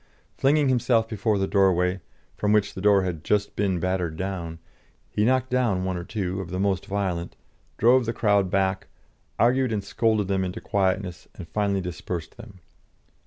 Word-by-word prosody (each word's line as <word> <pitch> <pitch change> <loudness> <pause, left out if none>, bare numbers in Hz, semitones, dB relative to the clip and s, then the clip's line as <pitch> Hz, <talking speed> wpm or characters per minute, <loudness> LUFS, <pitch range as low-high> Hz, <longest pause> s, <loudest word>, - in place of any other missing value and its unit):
Flinging 145 +1 +3
himself 120 -3 +2
before 110 -1 0
the 95 - +1
doorway, 95 -2 +2 0.3
from 105 - 0
which 105 -2 +2
the 95 - -7
door 100 -1 +4
had 85 -4 -4
just 105 -1 0
been 95 -3 0
battered 90 -2 -1
down, 90 -3 -4 0.5
he 105 - 0
knocked 130 +1 +1
down 115 -8 +1
one 95 -1 -1
or 85 - -4
two 95 -1 -3
of 90 - -8
the 90 +1 -3
most 95 -1 0
violent, 95 -4 -2 0.4
drove 120 +2 +4
the - - +1
crowd 100 -4 +2
back, 95 0 0 0.5
argued 125 +1 +3
and 105 -2 -1
scolded 110 -3 +1
them 95 -1 0
into 95 +4 -4
quietness, 95 -4 -1
and 85 - -9
finally 100 +1 0
dispersed 90 -1 -5
them. 110 -6 -13
100 Hz, 170 wpm, -25 LUFS, 95-110 Hz, 0.5 s, door